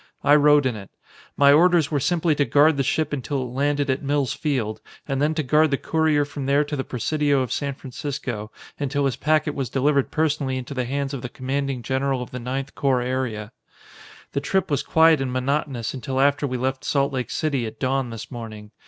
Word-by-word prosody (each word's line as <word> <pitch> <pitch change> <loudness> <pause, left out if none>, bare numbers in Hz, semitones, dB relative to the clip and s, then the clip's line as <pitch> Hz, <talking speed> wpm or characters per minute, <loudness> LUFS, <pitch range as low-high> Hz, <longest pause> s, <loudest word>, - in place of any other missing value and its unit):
I 145 - +5
rode 150 -1 +5
in 125 -3 0
it. 100 -2 -9 0.5
My 140 0 +6
orders 170 -1 +4
were 145 - +1
simply 165 +3 +1
to 145 - +2
guard 145 +2 +4
the - - +2
ship 145 +3 0
until 135 0 -2
it 125 -1 -7
landed 145 +1 0
at 130 - -2
Mills 140 -2 0
Field 125 -9 -2 0.3
and 135 -1 -1
then 155 +2 +1
to 155 - 0
guard 155 +4 +3
the 140 - +1
courier 155 -2 +1
from 145 -1 -6
there 140 +2 +3
to 145 0 -4
the 135 - -2
Presidio 145 +3 0
of 125 -3 -3
San 140 -2 -2
Francisco 125 -5 -5 0.3
until 140 0 0
his 135 - 0
packet 155 -1 +1
was 135 -5 -3
delivered 140 +2 +1
personally 150 -4 0
into 130 +2 -6
the 130 -2 -2
hands 140 +2 -2
of 135 - -4
the 125 - -5
Commanding 135 -1 -3
General 135 0 -1
of - - -12
the 125 - -5
Ninth 135 +3 -4
Corps 130 -3 +1
Area. 125 -4 -3 0.8
"The 140 - -2
trip 190 +3 0
was 140 - +1
quiet 160 -2 +4
and 130 -2 -2
monotonous 130 -2 -1
until 130 0 -3
after 140 +1 +3
we 130 -1 -3
left 130 +1 -2
Salt 140 -1 +1
Lake 130 -2 -2
City 140 -7 -1
at 110 - -10
dawn 135 -1 0
this 115 -1 -8
morning. 110 -3 -8
140 Hz, 215 wpm, -23 LUFS, 130-145 Hz, 0.8 s, My